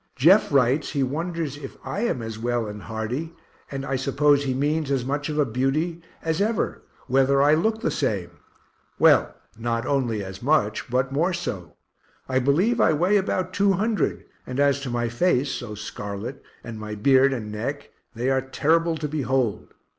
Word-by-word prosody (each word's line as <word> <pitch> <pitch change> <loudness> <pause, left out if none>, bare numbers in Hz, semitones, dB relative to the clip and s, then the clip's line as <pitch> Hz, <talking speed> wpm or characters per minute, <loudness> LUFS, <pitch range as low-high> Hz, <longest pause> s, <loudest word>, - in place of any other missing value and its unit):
Jeff 170 +10 +5
writes 140 +2 +2
he 140 -2 +1
wonders 160 +1 -3
if 135 -2 -9
I - - -3
am 210 - -1
as 110 -1 -6
well 120 0 -1
and 105 -1 -7
hearty, 120 +10 -4 0.3
and 135 -1 -5
I 135 -1 -1
suppose 140 +2 +3
he 130 - 0
means 150 +2 0
as 135 -3 0
much 145 +3 -2
of 150 - -3
a 150 - +3
beauty 140 +8 -1 0.2
as 160 +2 0
ever, 220 +1 0 0.2
whether 135 +1 +3
I 145 +2 +5
look 220 +8 +1
the - - 0
same. 100 - -1 0.7
Well, - - +4 0.2
not 115 +1 -1
only 125 -7 0
as 95 0 -8
much 125 -5 +1
but 130 +2 0
more 165 +7 +1
so 95 - -5 0.5
I 130 0 +1
believe 175 - +2
I 160 - +4
weigh 180 +7 +3
about 185 -1 -1
200, 200 +2 +1 0.2
and 125 +1 -4
as 140 -1 +3
to 140 -2 -5
my 120 0 -1
face, 135 +2 +1
(so 110 -3 -5
scarlet,) 105 +4 -6 0.2
and 115 -2 -7
my 105 0 -5
beard 135 +5 +4
and 110 -5 -4
neck, 140 +7 -4 0.2
they 125 +4 0
are 130 0 +2
terrible 160 +5 +1
to 150 0 -3
behold. 135 -6 -1
135 Hz, 175 wpm, -24 LUFS, 120-155 Hz, 0.7 s, Jeff